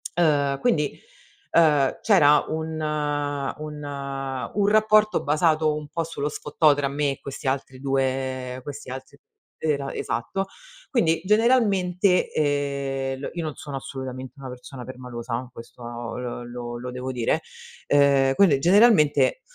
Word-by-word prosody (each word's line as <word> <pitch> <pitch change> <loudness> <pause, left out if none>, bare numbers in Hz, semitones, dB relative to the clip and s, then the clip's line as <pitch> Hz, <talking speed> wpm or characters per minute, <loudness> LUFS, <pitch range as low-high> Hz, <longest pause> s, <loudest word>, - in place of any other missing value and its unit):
Ehm, 145 -5 +2
quindi, 150 - 0 0.5
ehm, 150 -5 +4
c'era 150 -9 +5
un 160 0 -3
un 150 0 -3 0.7
un 200 -1 +2
rapporto 215 0 +4
basato 155 +1 +2
un 150 -1 -6
po' 165 - -2
sullo 155 -3 -3
sfottò 150 0 +2
tra 140 -1 0
me 145 +1 0
e 135 - -7
questi 140 +1 -7
altri 130 -1 -2
2 130 -1 -1
questi 145 -2 -8
altri 130 0 -9 0.4
era 140 -3 -1
esatto. 120 +12 -2 0.5
Quindi 165 -10 +2
generalmente, 200 -5 +3
ehm, 140 -2 -1
l - - -4
io 170 -1 -3
non 155 -2 -4
sono 145 -2 -6
assolutamente 130 -1 -7
una 135 -1 -7
persona 125 +1 -9
permalosa 125 -1 -6
questo 120 0 -12 0.3
l 120 -1 -6
lo 120 -1 -6
lo 125 +1 -6
devo 125 +1 -4
dire, 120 -3 0 0.5
ehm, 140 -2 +4
quelle 160 -7 +5
generalmente, 200 - +4
145 Hz, 130 wpm, -24 LUFS, 130-160 Hz, 0.7 s, c'era